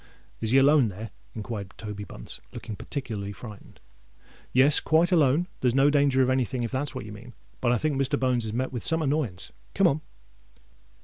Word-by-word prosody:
"Is 110 - -2
he 130 - +4
alone 140 -1 +5
there?" 105 +2 -7 0.2
inquired 105 -3 -6
Toby 105 -1 -6
Bunce, - - -8
looking 110 - -6
particularly 110 -6 -5
frightened. 105 +1 -12 0.7
"Yes—quite 150 +6 +4
alone. 155 -1 +4
There's 125 -1 +1
no 140 +2 +5
danger 140 -2 +3
of 130 - +1
any 130 0 +2
thing, 125 0 -3
if 115 - -3
that's 135 +1 -2
what 130 - -5
you 105 - -8
mean: 115 +4 -11 0.3
but 120 - +1
I 120 - +3
think 145 0 0
Mr. 140 +1 0
Bones 125 -3 +1
has 110 - -3
met 130 +4 -2
with 120 - -4
some 160 -1 +4
annoyance. 135 - -2 0.2
Come 195 - +3
on!" 155 -3 +3
130 Hz, 190 wpm, -26 LUFS, 110-145 Hz, 0.7 s, alone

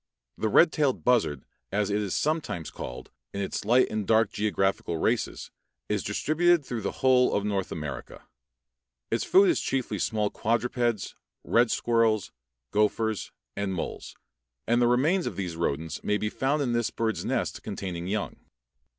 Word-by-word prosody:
The 110 - -1
red 160 +9 +6
tailed 145 -4 0
buzzard, 110 - +2 0.3
as 105 0 0
it 105 +1 +1
is 100 -3 -2
sometimes 150 - -1
called, 60 - -8 0.2
in - - -2
its 95 - -3
light 125 +4 +5
and 110 -2 -2
dark 110 -2 +3
geographical 95 -5 0
races, - - -1 0.4
is - - 0
distributed 170 0 +2
throughout 120 -3 -4
the 100 - -2
whole 130 -1 +3
of 100 - 0
North 100 -3 -1
America. 75 -4 -6 0.9
Its 115 - +1
food 385 +2 +5
is 345 - +2
chiefly 130 -2 -2
small 105 -2 0
quadrupeds, 120 -1 0 0.3
red 120 0 +3
squirrels, 115 -4 +1 0.4
gophers, 105 0 0 0.2
and 100 -2 -2
moles, 85 - -5 0.5
and 120 +1 +2
the 120 - +5
remains 150 +10 +2
of - - -4
these 90 -3 -4
rodents 80 -1 -2
may 105 - +1
be 105 0 -2
found 140 +2 0
in 120 -3 -1
this 120 -1 +1
bird's 110 -1 -2
nest - - -2
containing 90 -2 -5
young. 105 +1 -2
110 Hz, 160 wpm, -27 LUFS, 100-125 Hz, 0.9 s, red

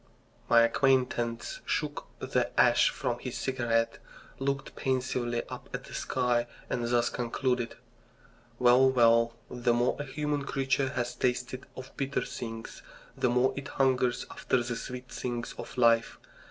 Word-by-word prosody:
My 115 0 +7
acquaintance 120 -2 +1
shook - - -2
the - - 0
ash - - +6
from 120 -1 -2
his 125 -1 -5
cigarette, 115 -2 0 0.4
looked 140 +1 -2
pensively 125 -3 -1
up - - -9
at - - -5
the - - -12
sky, 120 -2 0 0.2
and 120 -1 -1
thus 120 0 +2
concluded: 125 0 -1 0.8
Well, 125 +2 +6
well, 115 -2 +4
the 120 -1 +1
more 120 +1 +1
a 145 - -3
human 145 +1 -2
creature 135 -1 0
has 120 -1 -2
tasted 125 +1 -2
of 130 0 -9
bitter 140 -1 -1
things 115 -2 -7 0.3
the 125 - +1
more 125 +2 +3
it 140 0 -5
hungers 130 -3 +1
after 125 -2 0
the 120 0 -3
sweet 125 +2 -6
things 120 -1 -4
of - - -8
life. 115 -1 +4
125 Hz, 140 wpm, -29 LUFS, 120-130 Hz, 0.8 s, My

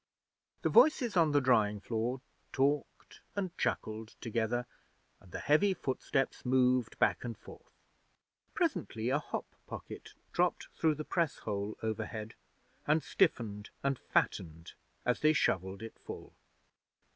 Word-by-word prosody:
The - - +3
voices 285 - +5
on 165 -4 +5
the 145 - +5
drying 110 -6 +3
floor 120 +4 -2 0.3
talked 140 +2 -1
and 185 -3 -2
chuckled 110 +1 -2
together, 115 +1 -1 0.5
and 90 - -18
the - - -4
heavy 190 +7 +3
footsteps 135 -1 -1
moved 125 -2 +2
back - - +2
and 115 -2 -5
forth. - - -14 0.8
Presently 125 - 0
a 140 +3 +2
hop - - -4 0.2
pocket - - -8 0.2
dropped - - +1
through 160 -2 +2
the 155 +1 -5
press 170 -5 0
hole 100 0 -3
overhead, 110 0 -3 0.5
and 150 +1 +3
stiffened 110 - +1
and 140 -2 +1
fattened 80 -1 -1 0.3
as 125 - +2
they 155 0 +5
shovelled 95 - 0
it 115 - -9
full. - - -9
125 Hz, 130 wpm, -33 LUFS, 110-150 Hz, 0.8 s, voices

